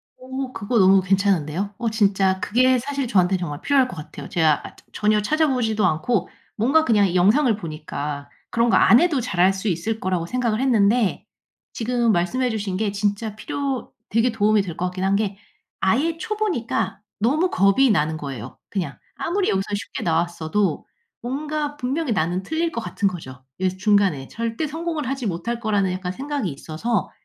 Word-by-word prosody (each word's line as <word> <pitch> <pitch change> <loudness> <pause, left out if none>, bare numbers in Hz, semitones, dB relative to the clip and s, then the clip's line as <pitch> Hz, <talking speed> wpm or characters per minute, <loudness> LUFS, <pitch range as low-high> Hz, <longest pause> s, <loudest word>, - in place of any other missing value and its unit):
어. 260 0 -5
그거 225 +2 0
너무 190 0 +6
괜찮은데요. 195 -1 0
어 235 -1 -1
진짜 195 -3 +2
그게 255 +5 +3
사실 275 +1 -3
저한테 190 -4 +3
정말 150 -5 -5
필요할 275 -3 +3
것 220 - -8
같아요. 150 - -9
제가 160 -3 +2
저 - - -19
전혀 210 0 +2
찾아 310 +9 +2
보지도 225 -6 +1
않고 180 +4 0 0.3
뭔가 280 +9 +3
그냥 205 - +3
영상을 220 +8 +4
보니까 150 -4 -5 0.2
그런 235 +1 +2
거 - - +5
안 235 - +7
해도 335 -6 +2
잘할 190 -5 +2
수 195 +3 -4
있을 205 +5 -1
거라고 185 -4 -1
생각을 235 +2 -1
했는데 225 -4 +2 0.5
지금 240 0 +1
말씀해 230 +8 +1
주신 205 -4 -2
게 210 0 0
진짜 205 +1 -2
필요 270 +3 -3 0.2
되게 230 +3 +2
도움이 215 -1 +3
될 175 -4 -6
것 180 - -1
같긴 185 +1 -3
한 195 +1 +2
게 200 -1 -1 0.4
아예 290 +12 +1
초보니까 410 - -2 0.2
너무 295 - +2
겁이 200 +8 +4
나는 155 -4 +1
거예요, 135 -5 -7
그냥. 190 -4 -3 0.2
아무리 375 +3 -1
여기서 190 0 +1
쉽게 205 - -5
나왔어도 170 +1 0 0.4
뭔가 295 +4 -3
분명히 275 +2 -2
나는 180 0 0
틀릴 325 - -1
것 230 - -3
같은 205 -2 -1
거죠, 135 -8 -7
이 185 0 +1
중간에. 190 -9 +2
절대 230 +6 -3
성공을 320 -1 -3
하지 270 -1 -3
못할 230 +7 -3
거라는 205 -4 +1
약간 185 0 -3
생각이 275 -1 -3
있어서 160 +8 -2
210 Hz, 355 characters per minute, -22 LUFS, 185-255 Hz, 0.5 s, 안